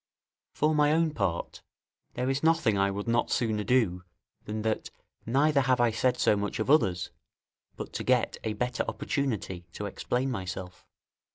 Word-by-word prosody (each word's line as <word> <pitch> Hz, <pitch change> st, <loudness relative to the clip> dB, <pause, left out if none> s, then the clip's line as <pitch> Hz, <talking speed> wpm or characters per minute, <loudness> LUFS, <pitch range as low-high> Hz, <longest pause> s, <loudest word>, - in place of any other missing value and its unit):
For 155 Hz, +1 st, +2 dB
my 150 Hz, -1 st, +4 dB
own 165 Hz, 0 st, +2 dB
part, 100 Hz, -, -2 dB, 0.5 s
there 125 Hz, +1 st, -1 dB
is 135 Hz, +1 st, 0 dB
nothing 160 Hz, -9 st, +3 dB
I 100 Hz, 0 st, +2 dB
would 100 Hz, +2 st, -4 dB
not 115 Hz, +1 st, +1 dB
sooner 110 Hz, -3 st, 0 dB
do 100 Hz, -6 st, +2 dB, 0.4 s
than 105 Hz, 0 st, -4 dB
that, 110 Hz, -1 st, -1 dB, 0.4 s
neither 140 Hz, +4 st, +3 dB
have 130 Hz, -1 st, +2 dB
I 120 Hz, -1 st, +4 dB
said 125 Hz, +3 st, +1 dB
so -, -, +3 dB
much 100 Hz, 0 st, -2 dB
of 110 Hz, +5 st, 0 dB
others, 95 Hz, -, +2 dB, 0.6 s
but -, -, -7 dB
to -, -, -3 dB
get -, -, +2 dB
a 110 Hz, -, -1 dB
better 125 Hz, +3 st, -1 dB
opportunity 105 Hz, -, -3 dB
to 105 Hz, -, -5 dB
explain 125 Hz, +6 st, -2 dB
myself. 95 Hz, -3 st, -6 dB
115 Hz, 165 wpm, -28 LUFS, 100-135 Hz, 0.6 s, my